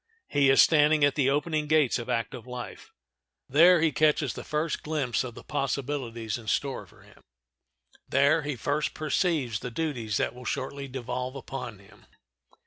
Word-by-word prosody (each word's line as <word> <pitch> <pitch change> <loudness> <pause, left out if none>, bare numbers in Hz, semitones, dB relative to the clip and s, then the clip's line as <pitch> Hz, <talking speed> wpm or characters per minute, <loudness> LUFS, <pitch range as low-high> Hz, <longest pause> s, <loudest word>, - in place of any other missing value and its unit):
He 140 -1 +3
is 135 - +7
standing 150 -1 +4
at 145 - +2
the 135 -2 +2
opening 150 +2 0
gates 150 -5 +3
of 120 - -7
active 115 +2 -3
life. 125 -1 -8 0.6
There 170 +5 +6
he 160 -1 +3
catches 150 -3 +2
the - - -7
first 155 +2 -2
glimpse 140 -8 -1
of 120 -3 -7
the - - -11
possibilities 130 -6 -3
in 110 - -13
store 135 +4 -1
for - - -20
him. - - -20 0.9
There 155 +3 +4
he 145 -1 -3
first 145 +5 -1
perceives 155 - 0
the 125 - -5
duties 120 -6 -2
that - - -1
will 125 +1 -11
shortly 140 +2 -4
devolve 125 0 -4
upon 135 -4 -6
him. 100 0 -20
140 Hz, 165 wpm, -27 LUFS, 125-150 Hz, 0.9 s, is